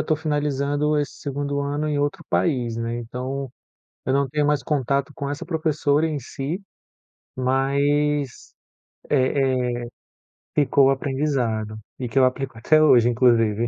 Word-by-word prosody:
estou 155 - +1
finalizando 150 -1 0
esse 145 -2 -2
2º 140 0 -2
ano 145 +2 -2
em 150 -1 0
outro 145 +5 -2
país, 125 -8 +1
né, 115 0 -2
então, 125 +3 -5 0.6
eu 130 - +1
não 140 0 +2
tenho 150 +2 0
mais 150 -1 +1
contato 140 -1 0
com 140 - -4
essa 145 +4 -4
professora 155 -2 +1
em 155 -2 -2
si, 140 +5 -4 0.8
mas, 140 +2 0 0.6
eh 130 -2 +2
eh, - - -2 0.8
ficou 140 -1 +4
o - - +5
aprendizado, 130 -6 -1 0.2
e 125 - -4
que 125 - -5
eu 130 - +6
aplico 130 0 -2
até 155 +6 +4
hoje, 120 -6 +6
inclusive. 115 -2 +3
140 Hz, 145 wpm, -23 LUFS, 130-150 Hz, 0.8 s, eu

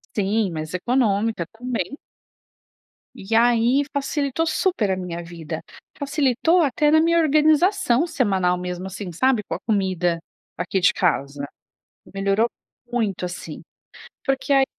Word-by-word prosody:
Sim, 205 0 +1
mas 155 +1 -5
econômica 215 -3 +1
também. 250 - -4 1.2
E 195 +4 -4
aí, 240 +3 +4
facilitou 285 +2 -1
super 320 - +1
a 190 - +1
minha 175 -2 -5
vida. 165 -2 -7 0.4
Facilitou 285 +4 +2
até 295 +2 +2
na 315 +1 +5
minha 335 +1 +3
organização 310 - +3
semanal 190 - +1
mesmo, 180 +1 -5
assim, 190 -1 -6
sabe, 245 +4 +2
com - - -5
a - - -6
comida 185 -5 0 0.4
aqui 180 +2 -1
de 180 - +5
casa. 140 -5 0 0.7
Melhorou 195 +3 +1 0.4
muito, 215 -7 -1
assim. 175 -3 -7 0.6
Porque, 270 0 -1
ai 270 -1 +5
220 Hz, 125 wpm, -22 LUFS, 180-275 Hz, 1.2 s, na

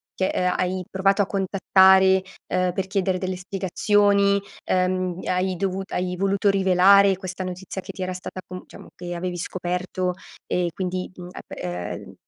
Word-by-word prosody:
che, 190 - 0
ehm, 180 0 0
hai 185 0 -1
provato 195 +1 +2
a - - -2
contattare, 190 -1 +4 0.3
ehm, 185 0 +1
per 190 0 -2
chiedere 190 -2 0
delle 185 0 -3
spiegazioni, 200 +2 +2 0.2
ehm, 185 -1 0
hai 185 0 0
dovut 195 +1 -3
hai 180 0 -2
voluto 195 +1 +1
rivelare 195 0 +5
questa 185 0 -6
notizia 185 +1 -6
che - - -8
ti 185 - -5
era 185 0 -3
stata 185 +1 -7
com 185 0 -8
diciamo, - - -13
che 175 0 -6
avevi 175 0 -3
scoperto 180 +1 -3 0.3
e 180 -1 0
quindi, 185 -1 -3
mhmm, 180 0 -9
ap - - -12
eh 90 0 -4
n - - -12
185 Hz, 165 wpm, -23 LUFS, 180-195 Hz, 0.3 s, rivelare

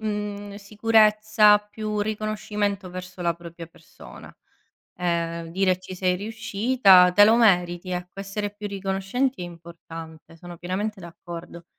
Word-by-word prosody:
mhmm, 205 -1 -4
sicurezza, 215 0 +4
più 210 0 -5
riconoscimento 210 -2 -3
verso 185 0 -8
la 170 -1 +1
propria 170 0 -10
persona. 160 -1 -15 0.6
Ehm, 170 -1 -2
dire: 185 0 +1
"Ci 185 0 -9
sei 180 0 +1
riuscita, 205 -2 +4
te 205 +3 +7
lo 220 +2 +5
meriti." 180 -5 +2
Ecco, 180 +2 -6
essere 200 +1 -4
più 205 0 -7
riconoscenti 195 +5 -2
è 175 - -4
importante, 165 -1 -11
sono 175 0 -11
pienamente 195 +5 -4
d'accordo. 170 0 -10
195 Hz, 125 wpm, -24 LUFS, 175-210 Hz, 0.6 s, te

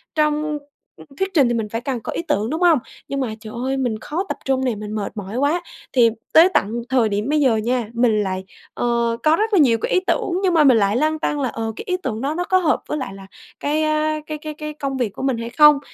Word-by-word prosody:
trong 300 0 +1 0.6
thuyết 385 0 -1
trình 285 -7 +5
thì 240 - 0
mình 225 -2 -2
phải 230 +2 -3
càng 255 -2 -3
có - - -5
ý - - -2
tưởng, 210 +4 0
đúng 320 +4 -3
hông? 335 -6 +5 0.3
Nhưng 275 - -3
mà, 250 -5 -2
trời 215 0 -10
ơi, 265 +1 -1
mình 240 -5 -1
khó 330 - -3
tập - - -2
trung 265 -1 +1
nè, 245 -3 0
mình 210 0 -7
mệt 210 +1 -4
mỏi 205 +4 -5
quá. 295 +6 +1 0.3
Thì 240 -3 +5 0.2
tới 335 +4 +8
tận 230 +4 +1
thời 250 -4 +3
điểm 210 +5 -2
bây 305 - +2
giờ 260 -6 +3
nha, 235 0 -1
mình 225 -3 +2
lại, 190 -1 -3 0.3
ờ, 235 -1 0
có 310 +1 +5
rất 435 +4 -1
là 390 - +5
nhiều 245 -7 +5
cái - - -2
ý 370 - +4
tưởng 375 - 0
nhưng 365 - +2
mà 320 -2 +5
mình 260 -5 +6
lại 200 +1 +2
lăn 310 +3 +1
tăn 295 -1 -1
là, 255 - 0
ờ, 225 0 -3
cái - - -7
ý 365 - 0
tưởng 225 -3 -3
đó 280 +3 -1
nó 355 - -1
có 375 - +2
hợp 340 -5 +1
với 300 - -2
lại 260 -8 -5
là 195 0 -11 0.3
cái, 300 +2 0
à, 310 0 +1
cái 305 -1 -4
cái 305 0 -7
cái 305 0 -6
công 275 -2 -4
việc 245 -4 0
của 265 - -7
mình 265 -4 +1
hay 230 0 -5
không. 300 +2 +6
265 Hz, 270 wpm, -21 LUFS, 230-305 Hz, 0.6 s, tới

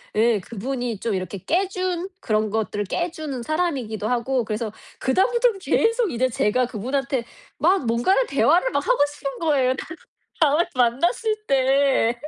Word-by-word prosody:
예, 225 -1 +3
그분이 235 +2 -4
좀 225 -4 -1
이렇게 185 +1 -4
깨 365 - 0
준 370 -1 -2
그런 215 -1 0
것들을 205 -2 -1
깨 345 - -2
주는 300 -7 -5
사람이기도 270 - -2
하고 245 0 0
그래서 215 0 -3 0.3
그 260 - 0
다음부터는 470 +1 +2
계속 455 +1 +1
이제 255 +2 +1
제가 240 +2 +1
그분한테 255 +2 -2 0.3
막 350 -4 +2
뭔가를 245 - +2
대화를 345 - +3
막 - - -1
하고 - - +3
싶은 275 -2 -6
거예요. 270 -5 +2
다음 320 +5 -8 0.4
다음에 310 +3 +4
만났을 335 - +1
때. 265 -3 +2
265 Hz, 330 characters per minute, -23 LUFS, 230-345 Hz, 0.4 s, 다음에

